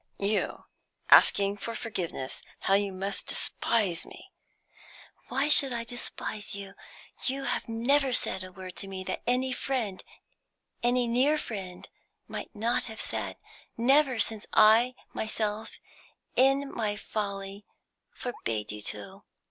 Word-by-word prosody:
"You 205 +1 -1 0.5
asking 200 0 +6
for 230 +3 -5
forgiveness? 175 - -4 0.2
How 195 - +2
you 200 0 +3
must 195 +1 -4
despise 205 -8 +1
me." - - -13 1.0
"Why 270 +3 +1
should 275 -3 +6
I 235 - -2
despise 225 -3 -4
you? 200 -1 -8 0.5
You 270 +1 -1
have 245 - -2
never 265 +4 +2
said 190 -5 +1
a 185 - -9
word 185 -1 -9
to 195 - -2
me 190 -1 -5
that 185 - -4
any 255 +1 +2
friend, 245 -7 -2 0.8
any 245 +1 +3
near 260 +6 +3
friend, 190 -9 -6 0.4
might - - -6
not 230 +3 0
have 220 -2 -8
said, - - -3 0.4
never 265 +2 +4
since 220 -1 +3
I 225 +4 +6 0.2
myself, 220 0 -3 0.6
in 275 +2 +3
my 210 -3 -1
folly, 200 -1 -4 0.4
forbade 110 - -3
you 105 0 -5
to. 105 0 -4
220 Hz, 130 wpm, -29 LUFS, 195-250 Hz, 1.0 s, asking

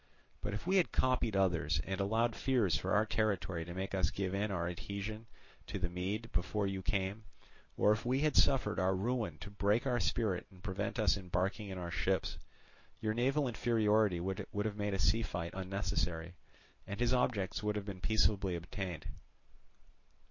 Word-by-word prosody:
But 100 - -2
if 105 - -6
we 190 +2 +3
had 180 - +3
copied 125 -4 +1
others, 85 -5 +2
and 95 0 -2
allowed 115 +4 +1
fears 115 - +2
for 70 - -2
our 105 +1 +4
territory 100 -6 0
to 85 - -7
make 95 +1 -3
us 95 -3 +2
give 95 -1 -2
in 100 +2 0
our 85 -3 -1
adhesion 100 +5 -5 0.4
to - - -3
the 90 -2 -2
Mede 100 +6 -3
before 95 +4 0
you 95 -1 -2
came, 100 +1 -1 0.5
or 105 - +5
if 105 - +1
we 130 +3 +1
had 155 0 +2
suffered 120 -6 +4
our 95 0 +2
ruin 105 -4 -1
to 100 -1 -7
break 105 +4 +2
our 125 -2 +2
spirit 105 -6 0
and 95 -2 -18
prevent 100 +2 -2
us 110 -3 +3
embarking 95 +3 -2
in 95 - -5
our 85 -1 -4
ships, 95 +2 0 0.6
your 110 -1 0
naval 135 +5 +2
inferiority 110 -5 +2
would 95 +2 -3 0.2
have 105 -2 -1
made 105 -1 -1
a - - 0
sea 100 +5 +3
fight 90 -6 -3
unnecessary, 90 -3 -2 0.5
and 100 - -5
his 120 +1 +3
objects 110 -7 +1
would 105 0 0
have 105 -1 -3
been 95 -3 -6
peaceably 100 -3 +2
attained. 85 -1 -5
100 Hz, 180 wpm, -34 LUFS, 95-110 Hz, 0.6 s, or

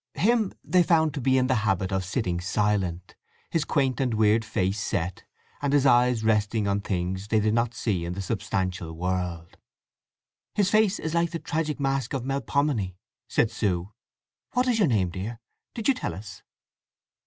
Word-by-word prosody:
Him 220 +1 +2
they 180 - +3
found 160 -3 +3
to 140 - -4
be 130 +1 +3
in 130 - +3
the 130 -1 +2
habit 95 -3 0
of 95 -1 0
sitting 90 -2 -1
silent, 95 -2 -1 0.4
his 165 - +1
quaint 135 -3 0
and 125 -4 0
weird 110 +1 +3
face 100 -1 -1
set, 95 -2 -2 0.4
and 145 -1 0
his 145 -1 +4
eyes 120 -2 +4
resting 105 -1 +1
on 100 0 +1
things 95 0 -2
they 110 0 +2
did 105 0 +1
not 120 0 +1
see 100 -8 -1
in 85 +1 -3
the 100 - -4
substantial 95 -3 -2
world. 90 -1 -3 1.0
"His 200 -2 +2
face 215 -1 +4
is 160 - -4
like 170 0 +2
the 165 - -3
tragic 155 -1 -2
mask 135 -1 -1
of 130 -2 -3
Melpomene," 135 -7 0 0.3
said 115 - +2
Sue. 100 -3 -1 0.6
"What 250 0 +2
is 240 -3 +2
your 200 - +4
name, 100 - +1
dear? 105 +6 -5 0.4
Did 225 - -3
you 275 - +5
tell 255 - -4
us?" 95 -1 -10
110 Hz, 175 wpm, -26 LUFS, 95-140 Hz, 1.0 s, you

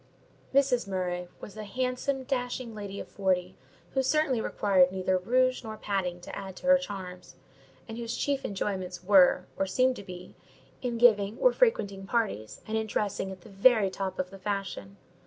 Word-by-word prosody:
Mrs. 265 -5 +3
Murray 180 -2 -2
was 205 - -10
a 215 - -6
handsome, 255 +5 -2
dashing 250 -2 -3
lady 200 -2 -6
of - - -7
forty, 185 -2 -1 0.4
who 265 - +1
certainly 270 -3 +2
required 185 -4 +3
neither 185 0 0
rouge 255 +6 +2
nor 220 -1 -6
padding 185 -4 -2
to - - -8
add 195 -1 -7
to 270 - -11
her 275 0 +6
charms; 190 -7 -8 0.5
and 225 0 -7
whose 230 0 -3
chief 280 -1 0
enjoyments 185 -2 -3
were, 185 -1 +5
or 195 - +1
seemed 255 +6 +2
to - - -8
be, 180 -1 -10 0.5
in 240 -2 -2
giving 215 -2 +4
or - - +4
frequenting 200 - +1
parties, 200 - -2
and 220 0 0
in 220 - -3
dressing 200 -2 -2
at 185 -1 -10
the 220 - -14
very 200 0 +4
top 190 0 -4
of 185 0 -3
the 195 - -11
fashion. 190 - -4
200 Hz, 175 wpm, -29 LUFS, 185-245 Hz, 0.5 s, her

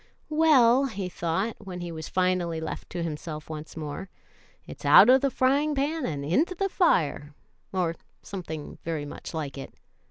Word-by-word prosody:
"Well," 275 -5 +5
he 200 -7 -4
thought, 180 +6 -2
when 185 -3 -7
he 175 -1 -5
was 160 -1 -7
finally 180 -3 0
left 160 - -6
to 175 -1 -4
himself 155 -1 -6
once 155 +1 -8
more, 155 +5 -6 0.6
it's - - -11
out 235 - +8
of 260 0 +6
the 275 - +2
frying 280 +4 +2
pan 290 +1 -1
and 140 -3 -4
into 300 - +1
the 390 +2 -1
fire,' 150 - +1 0.4
or 180 -3 0 0.3
something 160 -6 -7
very 160 -3 -3
much 145 - -8
like 145 -3 -4
it. - - -9
180 Hz, 165 wpm, -27 LUFS, 160-260 Hz, 0.6 s, out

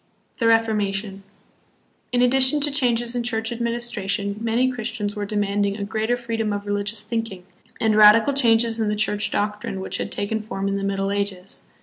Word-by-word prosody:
The 230 - +2
Reformation. 210 -3 +1 0.9
In 245 0 +2
addition 260 +3 +4
to 290 0 +2
changes 240 -3 0
in 245 - 0
church 225 -1 -2
administration, 235 -4 -1
many 235 +3 +1
Christians 220 -3 -3
were 205 -1 -4
demanding 205 -1 0
a 200 - -4
greater 220 +3 -1
freedom 225 -3 -2
of 205 0 -3
religious 205 +1 -2
thinking 220 -4 -4 0.4
and 220 -1 +2
radical 215 +5 +7
changes 230 -3 +2
hi 220 - +1
the 210 0 0
Church 210 0 +1
doctrine 210 -2 -2
which 190 - -4
had - - -4
taken 215 +2 -2
form 200 -2 -4
in 195 0 -1
the 200 - -4
Middle 195 0 -1
Ages. 200 -2 -4
215 Hz, 170 wpm, -22 LUFS, 205-235 Hz, 0.9 s, radical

